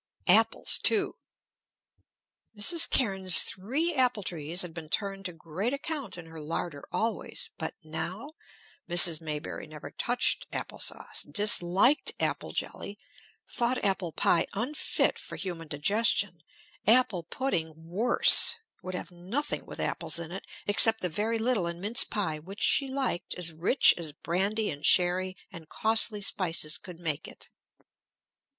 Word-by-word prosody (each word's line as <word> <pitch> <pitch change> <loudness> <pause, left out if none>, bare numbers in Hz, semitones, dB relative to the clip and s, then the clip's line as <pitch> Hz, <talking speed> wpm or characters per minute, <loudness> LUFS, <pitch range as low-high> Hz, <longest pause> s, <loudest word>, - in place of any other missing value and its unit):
Apples, - - +3
too. - - +3 1.4
Mrs. 325 +11 +3
Cairnes's 190 -7 +4
three 275 - -2
apple 250 -6 +1
trees 170 +1 -4
had 175 -2 -9
been 160 -2 -9
turned 195 +3 -2
to 180 - -3
great 170 - -5
account 280 - -5
in 175 - -9
her 165 0 -12
larder 150 -1 -5
always; 225 +1 -4
but - - -4
now, 180 - -6 0.6
Mrs. 170 -2 +7
Maybury 155 0 -6
never 155 -1 -11
touched 245 +1 -1
apple - - -6
sauce, - - -1
disliked 205 +5 +3
apple - - -2
jelly, 205 - -6 0.5
thought 245 +1 -1
apple 190 -3 0
pie 170 - +1
unfit 250 +9 -1
for - - -8
human 170 -4 -6
digestion, 195 +3 0 0.5
apple 225 -5 +3
pudding 165 -3 -3
worse; 190 - +6 0.3
would 185 0 -7
have 180 - -7
nothing 190 +13 -5
with - - -10
apples - - -1
in 170 -1 -5
it, 190 - -8 0.2
except 220 +2 +4
the 180 - -1
very 215 +7 -2
little 225 -5 -1
in 170 0 -6
mince 215 +7 +3
pie 180 -8 -3
which 195 +7 -6
she 275 - +3
liked 265 -10 -3
as 170 -2 -1
rich 170 - +4
as 160 -3 -6
brandy 195 +8 -2
and 145 +1 -9
sherry 185 +2 +3
and 165 -4 -12
costly 220 +3 +1
spices 165 -6 -1
could 180 -3 -12
make 155 -4 -2
it. - - -13
185 Hz, 140 wpm, -27 LUFS, 165-225 Hz, 1.4 s, Mrs